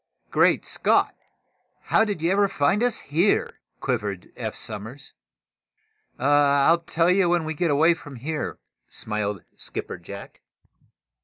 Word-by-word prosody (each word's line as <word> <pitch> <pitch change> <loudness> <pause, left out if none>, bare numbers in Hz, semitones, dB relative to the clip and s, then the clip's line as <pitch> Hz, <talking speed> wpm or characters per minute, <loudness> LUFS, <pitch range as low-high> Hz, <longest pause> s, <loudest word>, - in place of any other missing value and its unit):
"Great - - +3
Scott! - - +2 0.7
How 220 - +3
did 205 -7 -3
you 170 - +2
ever 200 +1 +3
find 150 +4 +1
us 245 -2 +1
here?" 170 +8 +1 0.2
quivered 105 -8 -3
Eph - - -4
Somers. 110 +6 -7 1.0
"I'll 145 +3 +4
tell 170 +1 +1
you 185 -1 +3
when 175 -1 +2
we 160 - -2
get 165 +2 0
away 155 +4 +5
from 145 -4 -11
here," 150 +5 -4 0.3
smiled 105 -3 -3
Skipper - - -6
Jack. - - -10
150 Hz, 130 wpm, -24 LUFS, 130-175 Hz, 1.0 s, away